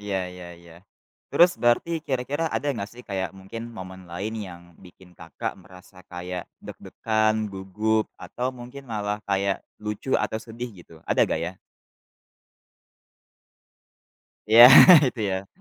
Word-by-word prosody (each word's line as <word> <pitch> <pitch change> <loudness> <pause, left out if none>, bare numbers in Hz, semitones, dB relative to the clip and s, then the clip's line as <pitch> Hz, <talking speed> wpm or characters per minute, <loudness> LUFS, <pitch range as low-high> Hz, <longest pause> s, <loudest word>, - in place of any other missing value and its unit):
Iya 100 -1 -3 0.2
iya 90 0 -11 0.2
iya, 85 -1 -16 0.6
terus 175 +1 +6
berarti 120 +7 +2 0.2
kira-kira 135 +4 -2
ada - - -2
nggak 100 -5 -5
sih 125 +1 -12
kayak 95 -2 -2
mungkin 100 +4 -8
momen 95 -1 -9
lain 100 +6 -4
yang 90 -4 -9 0.2
bikin 90 0 -17
Kakak - - -6
merasa 95 +1 -17 0.2
kayak 90 0 -6 0.2
deg-degan, 110 -1 -1 0.2
gugup 105 +3 -1
atau 125 +1 -5
mungkin 125 +3 -10
malah 105 -1 -2
kayak 100 0 0 0.3
lucu 105 +5 -5
atau 105 +1 -2
sedih 120 +2 -7
gitu 85 -1 -16 0.2
ada - - +2
nggak - - -1
ya? 85 - -5 3.0
Iya 115 +2 +9 0.5
itu 125 - -7
ya. 95 +1 -3
105 Hz, 130 wpm, -24 LUFS, 95-115 Hz, 3.0 s, Iya